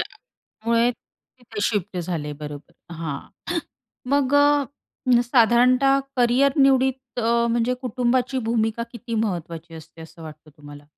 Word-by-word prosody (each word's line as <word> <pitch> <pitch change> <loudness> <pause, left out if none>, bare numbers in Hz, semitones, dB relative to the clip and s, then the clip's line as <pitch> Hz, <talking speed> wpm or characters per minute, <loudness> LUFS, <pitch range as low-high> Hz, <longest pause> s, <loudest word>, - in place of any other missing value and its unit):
त्याच्यामुळे 235 - -2
तिथे 235 -2 -13
शिफ्ट 205 -3 -1
झाले, 165 -4 -3
बरोबर 145 0 -9 0.2
हां 160 -4 -4 0.9
मग 280 -1 +2
अ, 285 -3 +2
साधारणतः 250 +3 +4 0.2
करिअर 250 +3 +3
निवडीत 265 -2 +2
अ, 235 +1 +2
म्हणजे 235 +2 +1
कुटुंबाची 250 +1 0
भूमिका 225 0 0
किती 235 0 -6
महत्त्वाची 170 -6 -3
असते, 160 +1 -13
असं 165 +1 -13
वाटतं 155 0 -11
तुम्हाला? 145 0 -12
235 Hz, 115 wpm, -23 LUFS, 165-255 Hz, 0.9 s, साधारणतः